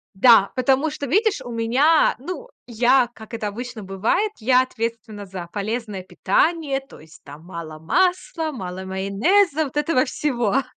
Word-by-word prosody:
Да, 200 -1 +6
потому 270 +4 +2
что, 285 -1 -5
видишь, 410 - +2
у 245 - -8
меня 250 +8 +3
Ну, 365 - -7 0.2
я, 245 +2 +3
как 220 +1 -11
это 215 -2 -3
обычно 240 +1 -7
бывает, 200 - 0
я 250 +3 +4
ответственна 225 -4 -5
за 185 -2 -7
полезное 210 -1 -4
питание. 275 - 0
То 270 - -16
есть, 160 +1 -17
там, 145 +3 -12
мало 165 -3 -8
масла, 355 - 0
мало 185 -6 -6
майонеза, 255 - +1
вот 280 -1 -9
этого 295 -3 +2
всего. 255 -3 0
240 Hz, 150 wpm, -22 LUFS, 200-290 Hz, 0.2 s, Да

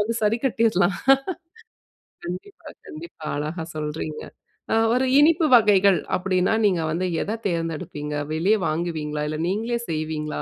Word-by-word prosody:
வந்து 220 +3 0
சரிக்கட்டிறலாம். 220 -5 +1 1.3
கண்டிப்பா, 180 - -8 0.2
கண்டிப்பா 335 - -10
அழகா 155 +3 -4
சொல்றீங்க 150 0 -4 0.5
அ - - +3 0.2
ஒரு 255 +1 +2
இனிப்பு 320 +2 +4
வகைகள் 200 -4 +5 0.2
அப்டின்னா, 185 +2 +1
நீங்க 180 -5 +2
வந்து 180 +3 -1 0.2
எத 220 +2 -3
தேர்ந்தெடுப்பீங்க? 165 -3 -4 0.2
வெளிய 185 +8 +2
வாங்குவீங்களா? 155 -2 -2
இல்ல 155 - -4
நீங்களே 225 +5 -1
செய்வீங்களா? 155 -1 -3
180 Hz, 115 wpm, -23 LUFS, 155-220 Hz, 1.3 s, வகைகள்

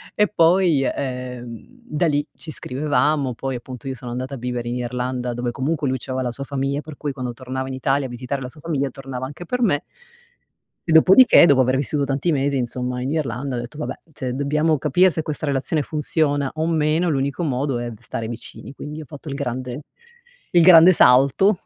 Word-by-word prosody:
E 210 -1 +3
poi, 170 -5 +3
ehm, 125 -3 -5 0.2
da 170 -6 0
lì 145 0 +1
ci 160 - -12
scrivevamo, 140 -1 0
poi 135 0 -4
appunto 125 +2 -8
io 135 - -2
sono 125 -1 -9
andata 130 +3 -4
a - - -7
vivere 120 -1 -4
in 120 - -2
Irlanda 125 0 -3
dove 120 0 -2
comunque 140 +4 -1
lui 130 0 0
c'aveva 130 +1 -3
la 125 - -2
sua 140 +4 -7
famiglia, 140 +1 -2
per 155 -2 -11
cui 145 -2 -3
quando 125 -3 -5
tornava 130 +1 -5
in 130 - -5
Italia 135 +1 0
a - - -12
visitare 125 +3 -4
la 125 - -5
sua 150 +2 -16
famiglia 145 -4 -1
tornava 130 -1 -6
anche 145 +5 -9
per 250 +7 -2
me. 155 -10 +2 1.1
E 165 - 0
dopodiché, 190 +11 +7
dopo 140 -5 +5
aver 130 +1 +2
vissuto 145 +1 -1
tanti 140 +4 0
mesi 140 0 0
insomma 125 0 -3
in 130 - -2
Irlanda, 135 -3 -2
ho - - -2
detto: 120 +5 -8
"Vabbè, 150 - -5
se 130 -3 -4
dobbiamo 150 +3 +1
capire 175 +7 +3
se 160 - -2
questa 155 -1 -4
relazione 140 +2 0
funziona 145 -1 0
o 160 +1 -1
meno, 160 +1 +1
l'unico 140 +2 -1
modo 135 -3 -1
è 120 0 -4
v 110 -3 -11
stare 115 -1 -5
vicini." 120 +3 -9
Quindi 150 +2 -8
ho 155 - -8
fatto 145 +4 -10
il 140 - -4
grande 125 -1 -4 0.7
il 175 - +5
grande 175 +1 +9
salto. 140 +8 +5
135 Hz, 205 wpm, -22 LUFS, 125-155 Hz, 1.1 s, grande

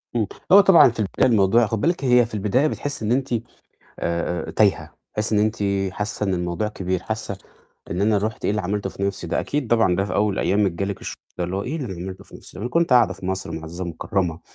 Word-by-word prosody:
امم، 115 -3 +2 0.3
هو 200 +2 +10
طبعًا 190 -9 +7
في 115 - -8
البداية 100 -3 +1
الموضوع 110 +2 +4
خُدي 110 -1 -2
بالِك 170 -3 0
هي 125 -1 +5
في 115 - -13
البداية 110 +8 +1
بتحسّي 145 -7 -4
إن 110 - 0
أنتِ، 130 0 0
آآ، 115 - +2 1.1
آآ، - - -3
تايهة، - - +1 0.2
تحسّي 110 +1 -1
إن 105 - +4
أنتِ 110 +1 +1 0.4
حاسة 105 +1 -3
إن 95 - +1
الموضوع 90 +4 -2
كبير، 95 -3 -3
حاسة 110 -2 -4 0.5
إن 90 - -2
أنا 105 +1 +3
رُحت 105 +2 -4
إيه - - +2
اللي 105 +1 -1
عملته 100 +1 -2
في 95 - -8
نفسي 95 -2 -2
ده؟ - - 0
أكيد 145 -2 -2
طبعًا 115 -6 +3
ده 95 - +1
في 100 - -4
أول 105 -2 +1
أيامِك 100 -2 +2
جه 85 +4 -3
لِك 100 0 -4
الشعور - - -8
ده، 90 - 0
اللي 90 +2 -3
هو 100 - -1
إيه 140 +9 -3
اللي 145 -6 -4
أنا 95 - -5
عملته 95 +2 -7
في - - -13
نفسي؟ - - -13
ما - - -6
أنا 120 - -3
كنت 170 -2 +2
قاعدة 120 -5 +5
في 95 -1 -9
مصر 95 -3 -3
معزّزة 80 +3 -6
مكرّمة، 85 0 -2
105 Hz, 245 wpm, -22 LUFS, 95-115 Hz, 1.1 s, هو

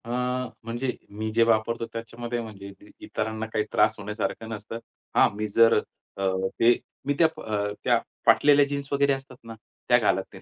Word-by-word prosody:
अ, - - -9 0.6
म्हणजे 120 +3 -2 0.2
मी 110 +2 -4
जे 115 +1 +5
वापरतो 115 +1 +1
त्याच्यामध्ये 115 +1 -4
म्हणजे 105 -3 -9
इत 100 - -14
इतरांना 110 0 -3
काही 105 - +2
त्रास 105 - +3
होण्यासारखं 105 +1 -4
नसतं. 110 +1 -6 0.4
हां. - - +6
मी 105 +1 -2
जर 115 +2 +5 0.4
अ, 100 - -3 0.4
ते 120 +1 +6 0.3
मी 145 - +1
त्या 165 - +7 0.2
अ, 105 -1 -1
त्या - - +3 0.3
फाटलेल्या 145 -1 +6
जीन्स 140 0 -4
वगैरे 140 0 +3
असतात 135 -1 -7
ना, 115 0 -9 0.4
त्या 120 - +7
घालत 95 -5 +2
नाही. - - -11
115 Hz, 175 wpm, -26 LUFS, 105-120 Hz, 0.6 s, त्या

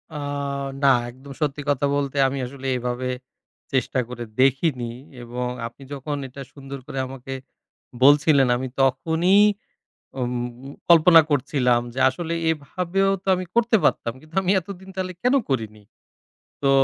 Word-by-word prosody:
আ - - -3 0.7
না, 140 - +7 0.2
একদম 130 +3 -12
সত্যি 145 -1 -1
কথা 145 0 +1
বলতে, 140 -1 -2
আমি 135 +1 -3
আসলে 135 +1 -7
এভাবে 125 +1 -3 0.6
চেষ্টা 130 0 +1
করে 120 -1 -6 0.2
দেখিনি। 130 -2 +2 0.3
এবং 125 +1 -4 0.2
আপনি 125 +4 -14
যখন 145 +2 -4
এটা 135 +2 -10
সুন্দর 140 -1 -8
করে - - -7
আমাকে 135 0 -8 0.7
বলছিলেন, 145 -1 +6
আমি 130 +1 -3
তখনই 160 +9 +3 0.8
উমউ 125 +1 -4 0.2
কল্পনা 165 0 +8
করছিলাম 125 -3 +2
যে 130 - -3
আসলে 165 +5 -4 0.2
এভাবেও 180 +5 -1
তো - - -43
আমি 185 - -3
করতে 235 -1 +4
পারতাম। 115 - +1
কিন্তু 155 +2 -19
আমি 185 - 0
এতদিন 190 +1 -10
তাহলে 185 -1 -3
কেন 250 +2 +3
করিনি! 110 -5 -3 0.8
তো 140 - +3
140 Hz, 140 wpm, -23 LUFS, 125-160 Hz, 0.8 s, কল্পনা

